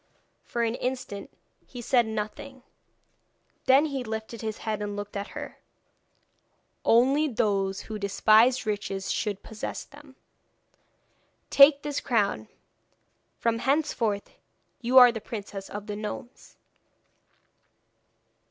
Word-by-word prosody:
For 235 - -2
an 230 -1 0
instant 250 -5 -4 0.4
he 250 - -9
said 240 -1 +2
nothing, 220 +5 -6 1.0
then 270 +3 +6
he 275 -4 -3
lifted 220 0 -6
his 220 -1 -4
head 215 -1 -2
and 205 0 -4
looked 205 0 -7
at 200 +1 -3
her. - - -8 1.2
'Only 270 +6 +4
those 200 -6 0
who 215 -1 -7
despise 220 +5 +4
riches 200 -2 -3
should 205 -3 -2
possess 220 -1 -6
them. 290 -2 -16 1.4
Take 285 +1 +7
this 290 -1 -2
crown, 200 - 0 0.9
from 230 -1 0
henceforth 240 -7 0 0.5
you 250 +2 +2
are 250 -1 +10
the 220 -2 -6
Princess 200 -3 -7
of 205 0 -7
the 210 -1 -5
Gnomes.' 215 +4 -8
225 Hz, 115 wpm, -27 LUFS, 205-255 Hz, 1.4 s, are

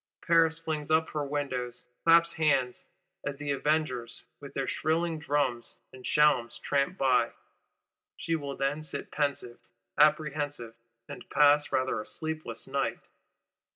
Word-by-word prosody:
Paris 165 -1 +4
flings 155 -2 -4
up 160 +1 +2
her 150 -1 -2
windows, 130 -4 -3 0.2
claps 170 0 +5
hands, 140 -6 +1 0.4
as - - -3
the 145 0 -3
Avengers, 140 -4 -1 0.2
with - - -10
their - - -1
shrilling 160 +1 0
drums 140 -5 -1 0.2
and 130 -1 -12
shalms 150 -6 +3
tramp 140 +6 0
by; 125 -3 +2 0.8
she 165 - -1
will 140 -3 -4
then 140 +3 -1
sit 155 - -4
pensive, 140 -5 -2 0.4
apprehensive, 145 -5 +2 0.3
and - - -10
pass 145 +1 +4
rather 130 -4 0
a - - -10
sleepless 155 -8 -4
night. 135 -4 -1
145 Hz, 130 wpm, -29 LUFS, 130-155 Hz, 0.8 s, claps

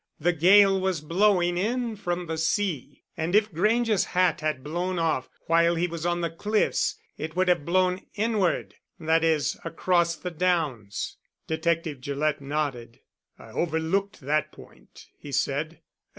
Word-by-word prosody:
"The 175 +3 +2
gale 195 +4 +5
was 190 -3 0
blowing 175 +2 +2
in 235 +3 -1
from 175 -3 -3
the 160 -1 -4
sea, 160 - -1
and 165 +4 -1
if 210 -2 +3
Grange's 215 +4 +2
hat 185 -2 +1
had 155 -4 -2
blown 175 +5 -2
off 160 -6 0 0.2
while 170 +1 +3
he 170 +1 +1
was 170 -1 -3
on 175 0 0
the 170 -2 -1
cliffs 210 +6 0 0.2
it 155 +1 -5
would 185 0 +2
have 175 -5 +2
blown 185 +1 +1
inward 215 -4 0 0.3
that 160 0 +2
is, 160 -3 +1
across 170 -1 +1
the 180 - -6
downs." 155 - -1 0.3
Detective 160 -3 -1
Gillett 145 +2 -1
nodded. 135 -5 -3 0.4
"I - - -14
overlooked 170 +4 -1
that 150 +2 0
point," - - -16
he 145 - -9
said. 140 +4 -1
170 Hz, 150 wpm, -26 LUFS, 155-185 Hz, 0.4 s, gale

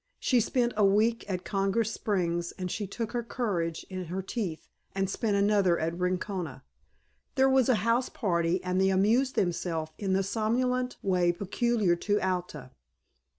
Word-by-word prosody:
She 250 - +3
spent 240 +1 +1
a 210 - +2
week 215 +3 +2
at 185 -2 -3
Congress 200 +3 0
Springs 175 -5 -1
and 185 -2 -5
she 205 -2 -3
took 225 +3 -4
her 240 -1 -1
courage 190 -9 -2
in 185 -1 -5
her 185 +3 -4
teeth 190 -6 -4 0.3
and 195 0 0
spent 205 +2 -1
another 200 -3 +3
at 160 +1 -1
Rincona. 180 -3 -3 0.7
There 265 - +4
was 265 -1 +3
a 255 - +5
house 235 +2 +2
party 170 -3 0
and 180 +1 0
they 190 - +4
amused 225 +8 +2
themselves 165 -3 -1
in 195 -2 0
the 195 +1 +2
somnolent 250 +5 0
way 180 -3 +2
peculiar 200 +1 +1
to 205 +4 0
Alta. 180 -8 -3
195 Hz, 160 wpm, -29 LUFS, 180-230 Hz, 0.7 s, a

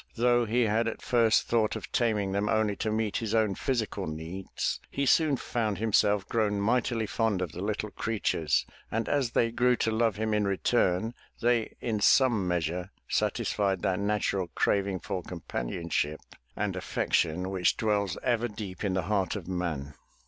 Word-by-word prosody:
Though 120 0 +3
he 120 +3 +2
had 115 +1 +1
at 115 - -4
first 115 -2 +3
thought 110 -2 +2
of - - -7
taming 105 -5 +1
them 100 +2 0
only 110 -2 +2
to 110 - -1
meet 110 -1 0
his 115 -1 -2
own 110 -3 +3
physical 110 - -2
needs, 80 +5 -4
he 140 - -1
soon 150 +1 +4
found 110 -4 -2
himself 105 -2 +2
grown 105 -3 +1
mightily 115 +1 +1
fond 110 -2 0
of 90 -4 -3
the 90 - -7
little 105 +1 -2
creatures, 100 -10 0 0.2
and 115 +1 -2
as 140 -4 +1
they 115 -1 +2
grew 125 +1 +3
to 115 - 0
love 110 -2 +2
him 110 +1 -1
in 105 -1 +2
return, 100 +1 +1 0.3
they 120 -1 +1
in 110 -3 -1
some 110 -3 +4
measure 90 +1 -1 0.2
satisfied 95 -3 0
that 95 0 +1
natural 100 -2 0
craving 100 -2 +1
for 95 -3 -3
companionship 80 -1 -3 0.4
and - - -2
affection 90 +4 0
which 95 -2 +1
dwells 105 -6 0
ever 120 -1 +1
deep 105 -4 -7
in 95 -3 0
the 95 - 0
heart 95 -1 0
of 95 -5 -6
man. 85 -6 -3
105 Hz, 170 wpm, -29 LUFS, 95-115 Hz, 0.4 s, soon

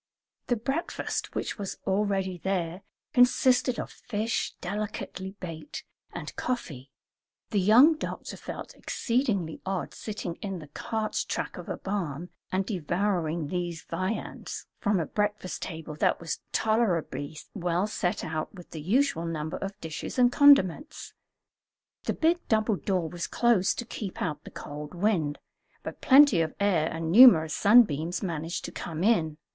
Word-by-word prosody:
The 245 - +2
breakfast, 270 +9 -3
which - - -3
was 200 -2 -4
already 195 -2 0
there, 180 -1 -2 0.3
consisted 250 0 +4
of - - -5
fish, 220 0 -2
delicately 195 -1 -5
baked, 170 - -7 0.3
and - - -7
coffee. 145 - -4 0.6
The 205 - +2
young 245 - +6
doctor - - -5
felt - - -7
exceedingly 225 - -1
odd, 190 -1 -3
sitting 195 -6 -5
in 195 -2 -3
the 155 -4 -10
cart 220 +7 -2
track - - -3
of - - -8
a - - -3
barn 180 -5 -3 0.2
and 190 +1 0
devouring 175 -3 -1
these 175 -3 -3
viands 185 +6 -4
from 205 -3 +1
a 165 - 0
breakfast 210 -1 -2
table 160 -3 -6
that - - +2
was 165 -2 -4
tolerably 180 -9 0 0.2
well 180 -1 0
set 195 -4 -2
out 155 -1 -3
with 175 -2 -12
the 160 - -6
usual 190 - +1
number 155 -1 -3
of 195 0 -6
dishes 160 +8 -6
and 245 -1 +5
condiments. 285 - +4 0.9
The - - 0
big 335 +2 +2
double 215 -1 +2
door 185 -4 -1
was 170 +1 -4
closed 235 -6 +2
to 240 - -3
keep 210 -4 -6
out 150 -3 -3
the - - -8
cold 150 +3 -8
wind, 170 -7 +1 0.5
but - - -7
plenty 270 - +7
of 160 -1 -2
air 185 -6 +2
and 165 0 -3
numerous 175 -9 +8
sunbeams 180 -6 +4
managed 165 -1 -3
to - - -6
come 165 0 -5
in. 165 -9 +2
190 Hz, 145 wpm, -28 LUFS, 165-220 Hz, 0.9 s, numerous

